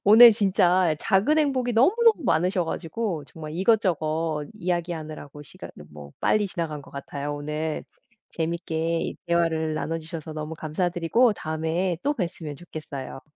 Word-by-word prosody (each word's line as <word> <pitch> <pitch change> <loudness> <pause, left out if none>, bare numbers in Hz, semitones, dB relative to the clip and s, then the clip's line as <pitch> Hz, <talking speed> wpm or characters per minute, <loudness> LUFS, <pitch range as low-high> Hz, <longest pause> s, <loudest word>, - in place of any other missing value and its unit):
오늘 225 +3 +10
진짜 185 -4 +3
작은 215 +10 +2
행복이 260 -5 +1
너무너무 410 - +4
많으셔 180 +1 +2
가지고 165 0 -3
정말 155 +1 -9
이것저것 165 -6 +1
이야기 175 -3 -1
하느라고 155 -2 -8
시간 140 - -11 0.2
뭐 75 -1 -11
빨리 210 -1 +2
지나간 165 -6 -4
것 - - -15
같아요. 140 +1 -5
오늘 150 +2 -3 0.5
재밌게 165 0 -2
대화를 165 -2 +1
나눠 155 +2 -2
주셔서 160 -1 -7
너무 155 +1 -5
감사 160 +3 -1
드리고 175 +8 +2
다음에 160 +1 -2
또 290 +2 +2
뵀으면 170 - -4
좋겠어요. 140 -5 -8
165 Hz, 335 characters per minute, -25 LUFS, 155-190 Hz, 0.5 s, 오늘